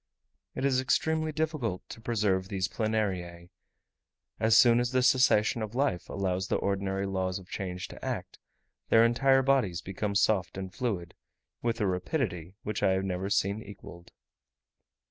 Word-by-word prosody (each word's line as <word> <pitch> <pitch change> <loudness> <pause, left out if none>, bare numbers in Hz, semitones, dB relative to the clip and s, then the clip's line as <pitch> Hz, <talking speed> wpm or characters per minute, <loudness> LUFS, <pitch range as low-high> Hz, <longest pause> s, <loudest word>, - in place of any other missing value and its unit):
It 135 - -2
is 130 -2 +3
extremely 155 +3 +1
difficult 150 - -2
to 115 - -9
preserve 105 -5 0
these 95 -2 -1
Planariae; 95 -6 -2 0.9
as 110 0 +4
soon 120 -1 +6
as 120 0 0
the 130 0 +3
cessation 125 -3 +4
of 110 +1 -5
life 135 -10 0
allows 95 -1 -1
the - - 0
ordinary 100 0 -1
laws 95 -1 -1
of 95 -2 -11
change 90 -2 -4
to - - -12
act, - - -4 0.5
their 115 0 +6
entire 135 +3 +3
bodies 125 -11 +2
become 100 +2 -3
soft 100 -3 +1
and 95 -1 -6
fluid, 100 -9 -3 0.5
with 115 -1 -1
a 105 - +1
rapidity 90 - -2
which 105 0 -3
I 95 - +3
have 95 +1 -1
never 95 +1 -2
seen 100 +1 +1
equalled. 95 -4 -12
100 Hz, 155 wpm, -29 LUFS, 95-120 Hz, 0.9 s, soon